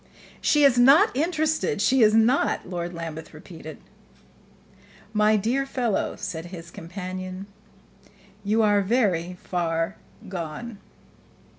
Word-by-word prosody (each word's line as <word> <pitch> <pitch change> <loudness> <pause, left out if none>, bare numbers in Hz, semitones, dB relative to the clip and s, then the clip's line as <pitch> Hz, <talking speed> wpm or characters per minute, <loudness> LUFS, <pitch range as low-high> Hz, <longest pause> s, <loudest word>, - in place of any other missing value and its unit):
"She 295 -1 +3
is 260 -3 +5
not 270 +2 +6
interested 315 - 0
she 255 +5 +3
is 215 -1 +5
not!" 230 +1 +2
Lord 175 -1 -4
Lambeth 165 -2 -7
repeated. 155 -1 -10 1.4
"My 210 0 +4
dear 235 +7 0
fellow," 250 -5 -1
said 175 -4 -6
his 170 -2 -10
companion, 185 +2 -7 1.0
"you 215 +2 +2
are 205 -1 +4
very 185 -5 0
far 165 0 -2 0.3
gone." 190 +5 -6
200 Hz, 110 wpm, -25 LUFS, 175-240 Hz, 1.4 s, not